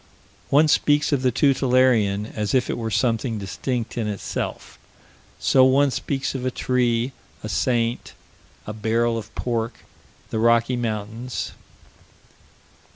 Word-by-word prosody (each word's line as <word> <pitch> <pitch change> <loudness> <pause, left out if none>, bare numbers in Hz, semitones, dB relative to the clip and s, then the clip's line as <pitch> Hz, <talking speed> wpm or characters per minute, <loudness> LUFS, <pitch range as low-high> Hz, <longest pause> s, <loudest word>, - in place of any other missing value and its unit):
One 150 +3 +5
speaks 145 0 +3
of 140 -3 +1
the 130 - +3
tutelarian 125 -7 +3
as 105 +3 -1
if 125 - +1
it - - -3
were 115 -1 -2
something 115 +2 0
distinct 120 +4 -3
in 110 - -1
itself. 105 -2 -5 0.6
So 130 - +4
one 135 +2 +4
speaks 135 +1 -2
of 130 -2 -4
a 130 - +1
tree, 125 -1 0 0.3
a 110 - -5
saint, 120 +2 0 0.5
a 105 - -5
barrel 115 +2 0
of 115 -2 -5
pork, 115 -2 -3 0.5
the 110 - -1
Rocky 115 +2 +3
Mountains. 115 +1 -4
120 Hz, 130 wpm, -23 LUFS, 110-130 Hz, 0.6 s, One